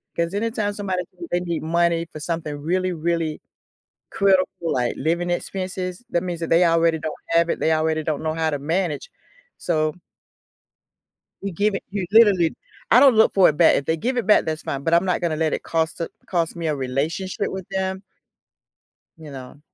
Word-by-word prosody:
'Cause 170 Hz, +2 st, -1 dB
anytime 215 Hz, -1 st, -1 dB
somebody 190 Hz, -3 st, -2 dB, 0.2 s
say 170 Hz, -, -6 dB
they 175 Hz, 0 st, +1 dB
need 170 Hz, -2 st, -3 dB
money 170 Hz, 0 st, +1 dB
for 155 Hz, -, -8 dB
something 165 Hz, -3 st, -3 dB
really, 180 Hz, +4 st, -1 dB
really 165 Hz, -1 st, -2 dB, 0.7 s
critical 190 Hz, -1 st, +3 dB, 0.2 s
like 125 Hz, -7 st, 0 dB
living 170 Hz, +4 st, -1 dB
expenses, 185 Hz, +2 st, -4 dB
that 175 Hz, -, 0 dB
means 175 Hz, -2 st, -4 dB
that 165 Hz, -, -4 dB
they 170 Hz, +2 st, +5 dB
already 165 Hz, -1 st, +3 dB
don't 155 Hz, -, -6 dB
have 170 Hz, 0 st, +3 dB
it, -, -, -2 dB
they 160 Hz, -, +2 dB
already 155 Hz, 0 st, +1 dB
don't 155 Hz, -1 st, -2 dB
know 155 Hz, 0 st, -1 dB
how 160 Hz, -1 st, 0 dB
to 145 Hz, -, -2 dB
manage, 160 Hz, -1 st, -2 dB, 0.5 s
so 155 Hz, -2 st, 0 dB, 1.5 s
you 200 Hz, -1 st, -3 dB
give 205 Hz, +3 st, +1 dB
it, -, -, -4 dB
you 195 Hz, -2 st, -3 dB
literally 205 Hz, -7 st, +5 dB, 0.4 s
I 245 Hz, -, +8 dB
don't 270 Hz, -5 st, +7 dB
look 220 Hz, -, +5 dB
for 190 Hz, -4 st, +6 dB
it 150 Hz, -, -3 dB
back, 170 Hz, -, +6 dB
if 140 Hz, -, -1 dB
they 160 Hz, 0 st, 0 dB
give 250 Hz, +10 st, -1 dB
it 240 Hz, -, 0 dB
back, 215 Hz, -, +5 dB
that's 155 Hz, 0 st, -3 dB
fine, 140 Hz, 0 st, -4 dB
but 165 Hz, -, 0 dB
I'm 170 Hz, +2 st, +5 dB
not 180 Hz, -, +1 dB
gonna 165 Hz, -3 st, 0 dB
let 155 Hz, 0 st, 0 dB
it -, -, -3 dB
cost 160 Hz, +1 st, -1 dB
a -, -, -2 dB, 0.2 s
cost 170 Hz, -3 st, -1 dB
me 165 Hz, -1 st, -3 dB
a 150 Hz, -, 0 dB
relationship 150 Hz, +10 st, -2 dB
with 190 Hz, -2 st, -6 dB
them 190 Hz, 0 st, -2 dB, 1.2 s
you 155 Hz, -3 st, -11 dB
know, 130 Hz, +1 st, -10 dB
170 Hz, 200 wpm, -22 LUFS, 160-185 Hz, 1.5 s, I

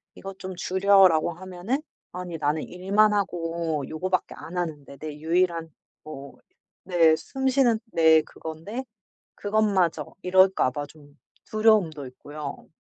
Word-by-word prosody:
"이거 195 Hz, 0 st, -8 dB
좀 185 Hz, 0 st, -7 dB
줄여."라고 185 Hz, -2 st, +4 dB
하면은 185 Hz, -, -4 dB, 0.3 s
"아니 180 Hz, -2 st, -6 dB
나는 150 Hz, 0 st, 0 dB
일만 200 Hz, +4 st, +2 dB
하고 170 Hz, -6 st, -2 dB
요거밖에 185 Hz, +3 st, -2 dB
안 180 Hz, -, -8 dB
하는데 150 Hz, -5 st, -4 dB
내 155 Hz, +2 st, -6 dB
유일한 165 Hz, 0 st, 0 dB, 0.3 s
뭐 140 Hz, -2 st, -10 dB, 0.5 s
내 165 Hz, -3 st, +4 dB
숨 265 Hz, +10 st, -4 dB
쉬는 250 Hz, -4 st, +3 dB
내 160 Hz, -1 st, +5 dB
그건데 165 Hz, +12 st, -7 dB, 0.5 s
그것마저." 200 Hz, -7 st, +1 dB, 0.2 s
이럴까 185 Hz, -5 st, +4 dB
봐 145 Hz, +2 st, -4 dB
좀 145 Hz, -1 st, -19 dB, 0.3 s
두려움도 210 Hz, -10 st, +2 dB
있고요. 145 Hz, +3 st, -8 dB
175 Hz, 255 characters per minute, -25 LUFS, 155-195 Hz, 0.5 s, 내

